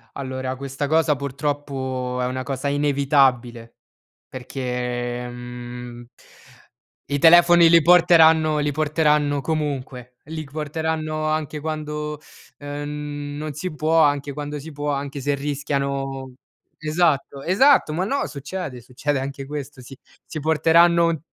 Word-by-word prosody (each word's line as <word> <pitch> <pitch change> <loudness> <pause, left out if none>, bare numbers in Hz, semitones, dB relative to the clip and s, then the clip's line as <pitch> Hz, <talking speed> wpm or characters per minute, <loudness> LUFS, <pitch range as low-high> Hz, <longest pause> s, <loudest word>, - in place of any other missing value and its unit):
Allora, 130 -1 -4
questa 135 +2 -4
cosa 160 0 +3
purtroppo 135 -2 -3
è - - 0
una 130 +1 -3
cosa 135 +1 -3
inevitabile 135 -5 +1 0.5
perché, 125 -1 -4
mhmm 120 0 -9 1.0
i 145 - +1
telefoni 170 +1 +7
li 165 0 +7
porteranno 160 -2 +5
li 145 0 0
porteranno 150 -1 +1
comunque. 130 -4 -4
Li 155 +1 -6
c 140 - -17
porteranno 155 +1 -3
anche 155 -1 -2
quando, 150 -1 -4 0.4
ehm, 145 0 -6
n - - -6
non 155 0 -5
si 155 +4 -5
può, 160 +2 +2
anche 145 -1 +1
quando 145 +1 -5
si 160 +3 -9
può, 145 0 -3
anche 140 0 -4
se 145 +2 0
rischiano 140 -2 -3 0.4
esatto, 155 -3 0
esatto! 195 - +4
Ma 180 +4 -1
no, 275 +7 -1
succede. 145 -2 -6
Succede 135 +4 -2
anche 135 0 -6
questo, 145 -2 -7
sì. 135 +2 -12 0.3
Si 155 - -7
porteranno 165 +3 +4
un 165 -2 -1
145 Hz, 130 wpm, -22 LUFS, 135-155 Hz, 1.0 s, telefoni